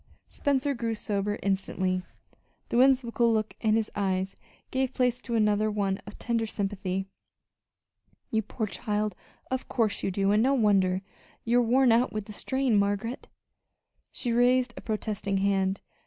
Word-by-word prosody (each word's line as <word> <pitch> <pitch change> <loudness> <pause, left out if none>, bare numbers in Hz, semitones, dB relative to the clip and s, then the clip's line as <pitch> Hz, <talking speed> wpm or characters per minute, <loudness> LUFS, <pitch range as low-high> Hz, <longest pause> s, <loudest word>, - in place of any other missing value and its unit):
Spencer 280 0 0
grew 230 -3 -2
sober 205 -1 -2
instantly. 190 -1 0 0.7
The - - 0
whimsical 245 -2 +4
look 220 -1 0
in 220 -1 +3
his 220 -1 0
eyes 190 -1 -1 0.4
gave 265 0 -1
place 250 -1 +1
to 240 - -6
one 210 -2 +1
of 205 - -9
tender 230 -2 -1
sympathy. 195 -2 -2 1.3
"You 220 - +2
poor 220 +1 -3
child, 210 -1 -2 0.4
of 260 0 -2
course 225 -4 0
you - - 0
do, 195 +1 +1
and 210 +1 +4
no 270 +3 +3
wonder! 195 -5 +3 0.4
You 240 +1 +4
are 240 - +1
worn 255 +1 +5
out 235 +2 +3
with 215 -1 -4
the 210 - -9
strain, 260 0 +1
Margaret." 205 +5 -1 0.8
She 240 - -2
raised 245 +1 +3
a - - -8
protesting 210 -2 -2
hand. 195 -1 +1
215 Hz, 150 wpm, -28 LUFS, 200-240 Hz, 1.3 s, worn